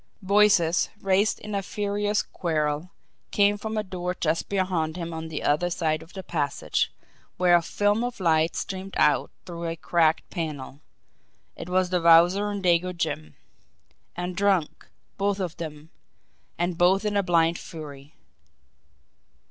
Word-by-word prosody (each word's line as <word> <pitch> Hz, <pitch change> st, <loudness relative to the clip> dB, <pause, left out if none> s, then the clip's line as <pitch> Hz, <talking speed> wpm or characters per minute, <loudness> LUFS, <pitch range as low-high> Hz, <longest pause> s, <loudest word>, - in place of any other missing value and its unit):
Voices, 190 Hz, -4 st, +4 dB
raised 195 Hz, +2 st, +2 dB
in 210 Hz, 0 st, -7 dB
a 200 Hz, -, 0 dB
furious 205 Hz, +1 st, -1 dB
quarrel, 155 Hz, -1 st, -2 dB, 0.4 s
came 205 Hz, 0 st, +3 dB
from 220 Hz, +1 st, -5 dB
a 215 Hz, -, 0 dB
door 180 Hz, -2 st, -4 dB
just 160 Hz, 0 st, 0 dB
beyond 180 Hz, -5 st, -1 dB
him 170 Hz, -1 st, -5 dB
on 160 Hz, 0 st, -5 dB
the 155 Hz, -2 st, -5 dB
other 155 Hz, +5 st, +2 dB
side 160 Hz, -3 st, -1 dB
of 160 Hz, +2 st, -15 dB
the 190 Hz, -, -7 dB
passage, 145 Hz, -6 st, -1 dB, 0.5 s
where 180 Hz, -1 st, +5 dB
a 170 Hz, -, +4 dB
film 205 Hz, +6 st, +1 dB
of 245 Hz, -2 st, -4 dB
light 160 Hz, -2 st, +2 dB
streamed 190 Hz, 0 st, -5 dB
out 150 Hz, -, +3 dB, 0.2 s
through 170 Hz, -1 st, -6 dB
a 165 Hz, 0 st, -2 dB
cracked 165 Hz, -1 st, +1 dB
panel 150 Hz, -4 st, -5 dB, 0.7 s
it 175 Hz, -, -8 dB
was 185 Hz, 0 st, +1 dB
the 180 Hz, -1 st, +1 dB
Wowzer 175 Hz, +5 st, +5 dB
and 200 Hz, -1 st, -4 dB
Dago 180 Hz, 0 st, +3 dB
Jim! 110 Hz, -, -3 dB, 0.8 s
And 180 Hz, 0 st, -4 dB
drunk, 190 Hz, -5 st, 0 dB, 0.3 s
both 200 Hz, 0 st, 0 dB
of 180 Hz, -3 st, -3 dB
them 155 Hz, -1 st, -8 dB, 0.7 s
and 175 Hz, 0 st, -2 dB
both 190 Hz, +4 st, +4 dB
in 210 Hz, -1 st, 0 dB
a 200 Hz, -, +4 dB
blind 170 Hz, -2 st, +2 dB
fury! 145 Hz, -2 st, -10 dB
175 Hz, 150 wpm, -25 LUFS, 160-195 Hz, 0.8 s, where